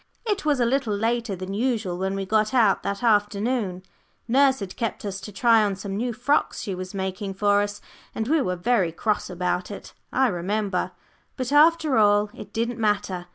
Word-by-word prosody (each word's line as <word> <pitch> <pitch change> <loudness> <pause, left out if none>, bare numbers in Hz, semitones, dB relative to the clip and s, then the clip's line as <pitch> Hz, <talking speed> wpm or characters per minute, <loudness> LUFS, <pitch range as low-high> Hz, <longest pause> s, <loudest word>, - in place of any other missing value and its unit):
It 410 -6 -1
was 295 -3 +2
a 240 - +3
little 240 -3 0
later 230 -1 -1
than 185 +1 -6
usual 220 -5 -1
when 190 +1 -1
we 195 0 -3
got 215 +4 +1
out 220 -6 +4
that 200 +3 -4
afternoon. 205 -2 +1 0.4
Nurse 265 +2 +4
had 195 -3 -6
kept 230 -3 -3
us 195 -1 -4
to 210 - -8
try 225 +2 +4
on 200 -2 0
some 195 0 -6
new 240 +4 -1
frocks 255 +6 0
she 195 - -4
was 185 +1 -6
making 190 +1 -4
for 205 +1 +3
us, 205 0 -4 0.3
and 220 - -2
we 310 +2 +3
were 180 -7 -1
very 190 -2 +1
cross 210 +6 -1
about 180 0 -2
it, 205 - -9 0.2
I 265 - +3
remember. 190 0 -2 0.4
But 255 0 -3
after 310 -1 +4
all, 205 0 +3
it - - -10
didn't 230 +1 -2
matter. 200 -4 -1
210 Hz, 195 wpm, -24 LUFS, 195-240 Hz, 0.4 s, out